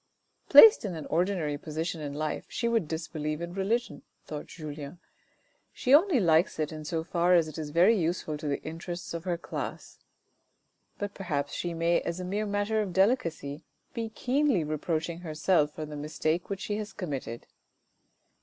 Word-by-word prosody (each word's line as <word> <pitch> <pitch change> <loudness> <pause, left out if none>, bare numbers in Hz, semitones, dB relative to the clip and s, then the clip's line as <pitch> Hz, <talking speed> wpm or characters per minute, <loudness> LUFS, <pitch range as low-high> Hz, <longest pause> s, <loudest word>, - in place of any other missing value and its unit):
" - - -42
Placed 450 0 +10
in 195 -5 -3
an 155 - -6
ordinary 165 -4 0
position 160 +2 -4
in 145 -1 -5
life 155 0 -3
she 235 - -1
would 230 -8 +1
disbelieve 155 -1 -3
in 170 0 -5
religion," 195 -4 -1 0.2
thought 150 -1 -6
Julien, 150 0 -8 0.4
" - - -41 0.3
she 255 - +1
only 320 -1 +6
likes 165 -3 +3
it 155 -1 -1
in 155 -1 -7
so 160 +1 -2
far 175 +1 +3
as 165 -2 +4
it 155 +1 -7
is 155 -2 -4
very 175 +9 +5
useful 170 -4 -1
to 155 - -5
the 140 - -2
interests 170 +3 -6
of 170 +1 -5
her 175 -2 0
class." 170 - -6 1.0
But 205 0 -4
perhaps 145 -7 -3
she 175 -1 -3
may 170 +1 +2
as 170 +1 -4
a 180 - -4
mere 205 +3 -2
matter 205 +2 0
of 195 -4 -4
delicacy 170 - +1 0.3
be 230 -1 -3
keenly 255 - +1
reproaching 160 +2 -2
herself 155 -2 +1
for 155 - -4
the 150 0 -8
mistake 155 +3 -2
which 200 -1 -4
she 205 - -2
has 215 0 -5
committed. 135 - -5
170 Hz, 180 wpm, -29 LUFS, 155-195 Hz, 1.0 s, Placed